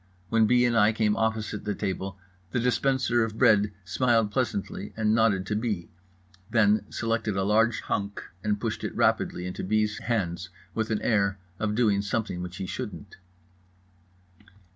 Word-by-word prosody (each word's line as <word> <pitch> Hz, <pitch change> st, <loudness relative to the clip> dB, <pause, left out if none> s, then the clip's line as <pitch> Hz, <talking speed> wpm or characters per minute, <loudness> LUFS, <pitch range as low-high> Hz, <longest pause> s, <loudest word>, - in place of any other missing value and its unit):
When 115 Hz, -1 st, +4 dB
B. 125 Hz, +2 st, +4 dB
and 120 Hz, -1 st, +2 dB
I 110 Hz, 0 st, +5 dB
came 105 Hz, -1 st, +2 dB
opposite 110 Hz, -2 st, -1 dB
the 105 Hz, -1 st, -2 dB
table 95 Hz, -1 st, -3 dB, 0.3 s
the 105 Hz, -, -1 dB
dispenser 125 Hz, -1 st, +2 dB
of 110 Hz, -1 st, -4 dB
bread 105 Hz, -1 st, +4 dB
smiled 115 Hz, +1 st, +2 dB
pleasantly 105 Hz, -4 st, -2 dB
and 110 Hz, -1 st, +2 dB
nodded 110 Hz, -4 st, +3 dB
to 105 Hz, -, -2 dB
B., 105 Hz, -6 st, -2 dB, 0.6 s
then 110 Hz, -2 st, +3 dB
selected 115 Hz, -3 st, -1 dB
a 95 Hz, -, +1 dB
large 110 Hz, +2 st, +3 dB
hunk 100 Hz, 0 st, -2 dB, 0.2 s
and 105 Hz, -1 st, 0 dB
pushed 110 Hz, 0 st, -3 dB
it -, -, -4 dB
rapidly 90 Hz, -, +1 dB
into 90 Hz, -, -5 dB
B.'s 110 Hz, +2 st, +1 dB
hands 95 Hz, -6 st, -2 dB, 0.2 s
with 110 Hz, 0 st, -1 dB
an 110 Hz, -2 st, -1 dB
air 100 Hz, -4 st, +2 dB, 0.2 s
of 105 Hz, -1 st, -1 dB
doing 105 Hz, -4 st, +3 dB
something 100 Hz, -3 st, -2 dB
which 90 Hz, 0 st, -6 dB
he 95 Hz, -, -4 dB
shouldn't. 105 Hz, -2 st, -6 dB
105 Hz, 160 wpm, -27 LUFS, 100-115 Hz, 0.6 s, I